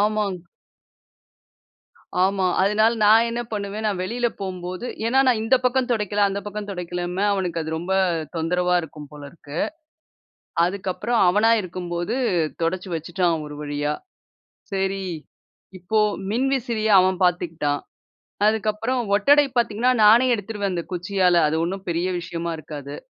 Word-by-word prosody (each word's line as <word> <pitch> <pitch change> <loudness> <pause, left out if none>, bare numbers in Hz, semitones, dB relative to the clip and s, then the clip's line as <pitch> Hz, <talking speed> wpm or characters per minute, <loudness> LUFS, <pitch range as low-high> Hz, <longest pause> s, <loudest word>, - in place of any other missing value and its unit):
ஆமாங் 210 -2 0 1.9
ஆமா, 195 0 +1 0.2
அதுனால 215 +3 +3
நான் 220 +2 +6
என்ன 235 +1 -3
பண்ணுவேன், 205 +1 -4
நான் 205 -3 -1
வெளில 240 +6 -1
போகம்போது 185 +2 -5 0.2
ஏன்னா, 255 +3 +2
நான் 245 -4 +3
இந்த 255 +4 +4
பக்கம் 250 0 +1
தொடைக்கல 210 -3 0
அந்த 200 +1 -3
பக்கம் 205 0 -5
துடைக்கலன்னு 180 +1 -3
அவனுக்கு 180 -4 -2
அது 160 - -5
ரொம்ப 175 +4 -3 0.4
தொந்தரவா 180 +2 +1
இருக்கும் 150 -2 -10
போல 150 -1 -11
இருக்கு. 150 -1 -9 1.1
அதுக்கப்புறம் 195 +5 -1
அவனா 210 +5 +4
இருக்கும்போது 175 +2 -4 0.5
துடைச்சு 180 +3 -2
வச்சுட்டான் 165 0 -1
ஒரு 150 0 -8
வழியா. 145 0 -2 0.8
சரி, 195 0 -1 0.8
இப்போ 215 +5 0 0.3
மின்விசிறிய 235 -3 0
அவன் 185 0 +1
பார்த்துக்குட்டான். 165 -5 0 0.7
அதுக்கப்புறம் 220 +3 0 0.2
ஒட்டடை 285 +8 +5
பார்த்தீங்கன்னா, 235 +2 +2
நானே 230 +4 +7
எடுத்துருவேன் 205 -2 -3
அந்த 170 - -2
குச்சியால 180 -1 +2
அது 155 - -1
ஒன்னும் 190 +2 -5
பெரிய 170 +2 -1
விஷயமா 170 0 -4
இருக்காது. 145 -2 -8
190 Hz, 125 wpm, -23 LUFS, 175-215 Hz, 1.9 s, நானே